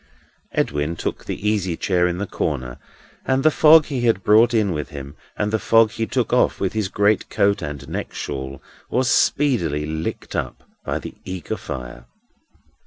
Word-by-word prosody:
Edwin 75 +3 -1
took - - -4
the 105 - -4
easy 95 -6 0
chair 90 -2 +2
in 90 0 -2
the 100 - -2
corner; 65 -9 -3 0.4
and 130 0 +1
the 155 - +5
fog 155 0 +7
he 135 -5 -3
had 115 -5 +2
brought 110 +3 +5
in 110 -4 +2
with 75 -3 -3
him, 70 -2 -8 0.2
and 105 0 -1
the 110 - +2
fog 115 0 +4
he 115 0 -3
took 125 -2 -1
off 125 - +3
with 95 - -1
his 110 -3 -1
greatcoat 100 0 +1
and 75 -2 -6
neck - - -4
shawl, 65 -1 -6 0.3
was 130 0 +1
speedily 85 - +2
licked 80 +1 -4
up - - -4 0.2
by - - -2
the - - -7
eager 90 -3 -5
fire. - - -7
95 Hz, 175 wpm, -22 LUFS, 75-115 Hz, 0.4 s, fog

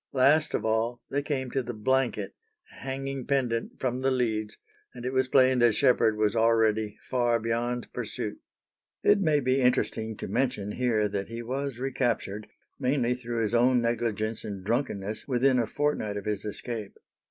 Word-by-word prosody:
Last 140 +4 +4
of 110 - -2
all 115 +2 0
they 140 - +1
came 135 -3 -3
to 135 - 0
the 120 -1 -6
blanket 120 -3 0 0.5
hanging 135 0 -4
pendent 125 -5 -1
from 130 -1 -1
the 135 - +2
leads, 110 -4 -1 0.4
and 120 -1 -8
it 130 - -2
was 130 0 +2
plain 130 -1 +4
that 120 -3 +4
Sheppard 120 -5 +3
was 105 0 +1
already 110 -2 +2
far 120 -2 +2
beyond 120 +2 -2
pursuit. - - -4 0.6
It 205 -1 +5
may 155 -5 +3
be 130 0 +1
interesting 110 -3 +1
to - - -5
mention 105 -2 -1
here 110 -3 +1
that 100 -1 -3
he 115 +1 -6
was 135 +1 -3
recaptured, 125 -5 -2 0.3
mainly 125 -2 +1
through 120 -2 -3
his 110 - -1
own 125 +1 +4
negligence 115 -2 -1
and 100 -3 -6
drunkenness, 110 -3 -2
within 130 0 +3
a 115 - 0
fortnight 125 -7 -1
of 100 - -6
his 105 -1 -2
escape. 105 0 -4
120 Hz, 165 wpm, -28 LUFS, 110-130 Hz, 0.6 s, It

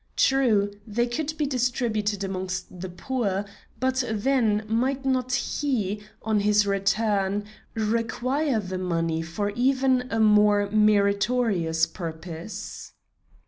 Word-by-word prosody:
True, 225 -7 +3 0.2
they 235 +3 +1
could 310 +5 -3
be 300 - +1
distributed 235 -6 0
amongst 185 -1 -4
the 185 - -5
poor, 200 +1 -2 0.3
but 260 +1 +1
then, 220 -1 +1
might 260 +5 0
not 255 -1 0
he, 240 -5 -1 0.2
on 220 -1 +1
his 210 0 +3
return, 200 0 +1 0.3
require 235 +5 0
the 185 -2 -4
money 165 -3 -1
for 185 +6 -3
even 260 +1 +2
a 225 - -1
more 210 -1 +5
meritorious 200 -4 +2
purpose? 165 +3 -7
210 Hz, 110 wpm, -25 LUFS, 195-250 Hz, 0.3 s, more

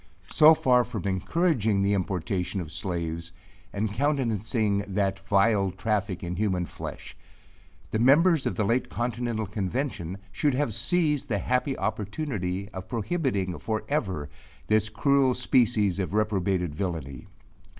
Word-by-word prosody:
So 155 +1 +7
far 125 -4 +4
from 115 -7 -6
encouraging 105 - +1
the 100 +1 +2
importation 95 0 -2
of 80 -4 -6
slaves, 85 -2 -4 0.4
and 105 0 -2
countenancing 115 -5 0
that 95 0 -1
vile 100 +1 +2
traffic 100 0 -2
in 90 0 -3
human 95 -4 0
flesh; - - -8 0.8
the 110 - 0
members 150 +5 +4
of - - -2
the 110 - 0
late 115 +5 +1
continental 120 -2 -2
convention2 95 - -3 0.2
should 145 +6 +1
have 135 -5 0
seized 155 - +2
the 105 - +1
happy 125 +7 0
opportunity 105 - -3
of 95 -2 -8
prohibiting 110 - -1
for 110 -1 -2
ever 95 - -1 0.4
this 110 0 +2
cruel 130 +3 +2
species 110 -6 +2
of 95 +1 -2
reprobated 95 -5 0
villainy. 80 -5 -4
105 Hz, 130 wpm, -27 LUFS, 95-125 Hz, 0.8 s, So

